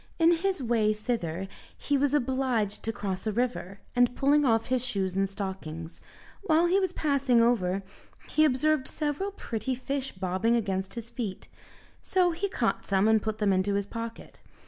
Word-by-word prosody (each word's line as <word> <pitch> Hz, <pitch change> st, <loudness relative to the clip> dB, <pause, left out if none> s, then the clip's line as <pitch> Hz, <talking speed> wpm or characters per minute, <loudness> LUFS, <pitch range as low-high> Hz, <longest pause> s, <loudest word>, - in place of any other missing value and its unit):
In 330 Hz, 0 st, +5 dB
his 375 Hz, -4 st, -1 dB
way 225 Hz, -3 st, +2 dB
thither, 195 Hz, -5 st, -3 dB, 0.3 s
he 285 Hz, -, 0 dB
was 285 Hz, +1 st, +2 dB
obliged 255 Hz, -6 st, 0 dB
to 225 Hz, -, -2 dB
cross 195 Hz, -1 st, -4 dB
a -, -, +1 dB
river, 210 Hz, -4 st, -2 dB
and 245 Hz, 0 st, +3 dB
pulling 290 Hz, +2 st, +3 dB
off 225 Hz, -3 st, +3 dB
his 255 Hz, -1 st, +1 dB
shoes 195 Hz, -7 st, -1 dB
and 195 Hz, 0 st, +1 dB
stockings, 185 Hz, -5 st, -6 dB, 0.4 s
while 335 Hz, -4 st, +3 dB
he 365 Hz, +3 st, +3 dB
was 375 Hz, -3 st, 0 dB
passing 280 Hz, -7 st, +2 dB
over 200 Hz, -5 st, +2 dB, 0.4 s
he 310 Hz, -, +3 dB
observed 305 Hz, 0 st, +2 dB
several 305 Hz, +6 st, -2 dB
pretty 255 Hz, -, -3 dB
fish 270 Hz, +1 st, -3 dB
bobbing 190 Hz, +5 st, 0 dB
against 195 Hz, -3 st, -1 dB
his 235 Hz, 0 st, -6 dB
feet; 215 Hz, -7 st, -5 dB, 0.5 s
so 365 Hz, -2 st, +2 dB
he 365 Hz, +5 st, -2 dB
caught -, -, -1 dB
some 195 Hz, +1 st, +3 dB
and 220 Hz, -1 st, +4 dB
put 220 Hz, 0 st, -3 dB
them 205 Hz, -3 st, +2 dB
into 190 Hz, +2 st, +1 dB
his 200 Hz, 0 st, 0 dB
pocket. 230 Hz, +2 st, -7 dB
235 Hz, 170 wpm, -28 LUFS, 200-280 Hz, 0.5 s, In